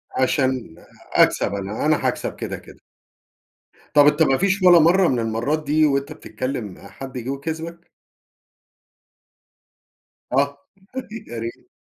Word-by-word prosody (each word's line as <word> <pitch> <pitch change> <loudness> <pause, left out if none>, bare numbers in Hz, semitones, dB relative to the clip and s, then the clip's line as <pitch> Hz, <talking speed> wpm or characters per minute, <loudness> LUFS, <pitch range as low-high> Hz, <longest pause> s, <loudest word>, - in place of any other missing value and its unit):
عشان 130 - 0 0.4
أكسب - - +3
أنا، 100 +6 -3
أنا 155 0 +2
هاكسب - - -3
كده - - -5
كده. - - -15 1.1
طب 145 -1 +7
أنت 150 +2 +4
ما 135 -3 +3
فيش 195 +1 +1
ولا 180 -2 +8
مرة 175 +3 +5
من 125 -2 +1
المرات 115 +8 -1
دي 155 +2 +3
وأنت 140 -1 0
بتتكلم 125 -7 -5
حد 135 -1 -9
جه 125 +2 -5
وكسبك؟ 160 +4 -5 2.5
آه 140 +2 +1 0.7
يا 120 - -6
ريْت. 115 +1 -7
140 Hz, 120 wpm, -22 LUFS, 125-155 Hz, 2.5 s, ولا